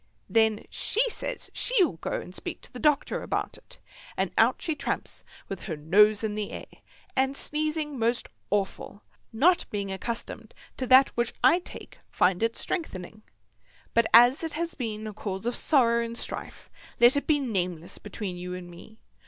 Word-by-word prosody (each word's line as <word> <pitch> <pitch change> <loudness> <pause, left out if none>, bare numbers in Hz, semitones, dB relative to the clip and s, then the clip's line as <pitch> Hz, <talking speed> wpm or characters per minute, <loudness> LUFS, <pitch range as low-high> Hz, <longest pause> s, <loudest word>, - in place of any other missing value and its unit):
Then 220 -1 +2
she 470 +4 +1
says - - -5
she'll 380 - +2
go - - -5
and 180 - -10
speak - - -6
to - - -15
the 250 - -7
doctor 300 0 +1
about - - -3
it; - - -13 0.4
and - - 0
out - - +4
she 325 - -1
tramps 290 - -3 0.2
with - - -6
her 160 -6 -4
nose 205 +8 +4
in 215 -1 -1
the 210 -1 -3
air, - - -7 0.5
and 270 +1 +1
sneezing 305 -2 -1
most 235 +2 0 0.2
awful, 200 0 -2 0.3
not 330 +11 +3
being 200 -2 -3
accustomed 230 +5 -5 0.2
to 255 - -3
that 260 +1 +7
which 235 0 -2
I 260 +8 +6
take, 360 - -9
find 180 +1 +2
it 230 0 +1
strengthening, 215 - -4 0.7
but 230 -1 +4
as 245 +6 +7
it 320 - -3
have 335 +2 -3
been 220 -3 -4
a 215 - -5
cause 195 0 -5
of 240 - 0
sorrow 235 -5 +3
and 230 0 -5
strife - - -6 0.3
let 240 +2 +7
it 285 - -1
be 305 - +4
nameless 180 - -3
between 205 -3 -5
you 180 +1 -5
and 175 -1 -9
me. 220 +5 -14
230 Hz, 175 wpm, -27 LUFS, 200-280 Hz, 0.7 s, that